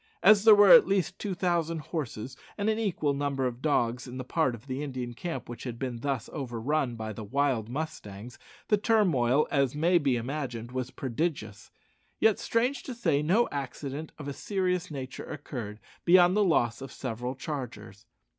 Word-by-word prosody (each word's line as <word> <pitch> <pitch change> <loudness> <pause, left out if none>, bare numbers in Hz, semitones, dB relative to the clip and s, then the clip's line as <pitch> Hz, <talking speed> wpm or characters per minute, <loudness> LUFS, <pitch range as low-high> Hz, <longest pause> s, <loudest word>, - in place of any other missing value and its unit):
As 215 0 +7
there 220 -1 +10
were 205 -2 +7
at 245 - +9
least 195 -3 0
two 200 -3 -3
thousand 170 -2 0
horses 135 -6 -5 0.2
and 210 +1 +1
an 220 - -1
equal 170 -9 0
number 140 -1 -1
of 125 0 -3
dogs 125 -4 0
in 125 +1 -7
the 130 - -4
part 130 -1 0
of 115 +3 -15
the 130 0 -4
Indian 130 -4 -4
camp 165 +8 -5
which 120 - -8
had 120 -2 -5
been 125 -2 -4
thus 135 -3 -2
overrun 130 0 -1
by 110 -1 -5
the 110 - -7
wild 130 -1 0
mustangs, 125 -6 -6 0.3
the 210 - +5
turmoil, 160 - +3
as 140 -2 +1
may 170 +4 +3
be 140 -5 +1
imagined, 120 -2 -4
was 130 -1 -3
prodigious! 125 -6 -3 0.5
Yet, 220 -2 +4
strange 245 +5 0
to 255 - -7
say, 165 -11 +1
no 190 +10 +3
accident 140 +2 -5
of 145 -3 -8
a 140 - -3
serious 180 0 -1
nature 130 -4 -6
occurred 105 -6 -7 0.2
beyond 180 +1 +6
the 210 - +4
loss 130 - +1
of 135 -1 -7
several 125 0 -4
chargers. 115 -7 -7
140 Hz, 180 wpm, -28 LUFS, 120-170 Hz, 0.5 s, there